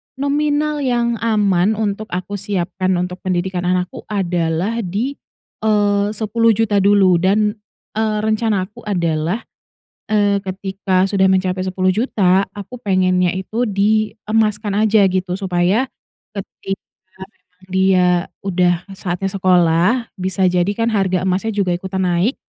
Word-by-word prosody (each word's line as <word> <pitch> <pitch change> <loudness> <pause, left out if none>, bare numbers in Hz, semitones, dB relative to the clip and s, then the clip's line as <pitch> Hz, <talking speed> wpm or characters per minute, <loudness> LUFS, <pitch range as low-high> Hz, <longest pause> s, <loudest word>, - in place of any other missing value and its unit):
nominal 295 +2 0
yang 240 -3 0
aman 210 -3 +2
untuk 215 0 -2
aku 185 +3 -4
siapkan 185 -2 -1
untuk 180 +1 -3
pendidikan 180 0 -2
anakku 180 0 -2
adalah 180 +2 -1
di, 215 +7 -2 0.5
eee, 205 -2 +2
Rp10.000.000 220 -1 +2
dulu 195 -3 +4
dan, 210 +3 +2 0.4
eee, 215 0 -1
rencana 215 -3 +1
aku 200 +3 -12
adalah, 170 +1 -1 0.6
eee, 205 -2 +2
ketika 190 -1 -1
sudah 190 -1 +2
mencapai 185 0 +1
Rp10.000.000 185 0 +1
aku 220 +5 -8
pengennya 185 -3 +1
itu 220 +6 -2
diemaskan 215 0 +1
aja 210 -1 +4
gitu, 185 -1 -1
supaya 190 +4 +1 0.5
ketika 195 -1 -6 0.4
memang 185 -2 -20
dia 190 -1 +3 0.4
udah 180 -2 +1
saatnya 190 -1 -3
sekolah, 185 +5 +2
bisa 190 +1 -1
jadi 180 +1 +1
kan 230 0 0
harga 190 -3 +1
emasnya 190 +4 0
juga 190 -3 +1
ikutan 190 +2 -2
naik. 180 +8 +1
195 Hz, 120 wpm, -18 LUFS, 185-215 Hz, 0.6 s, dulu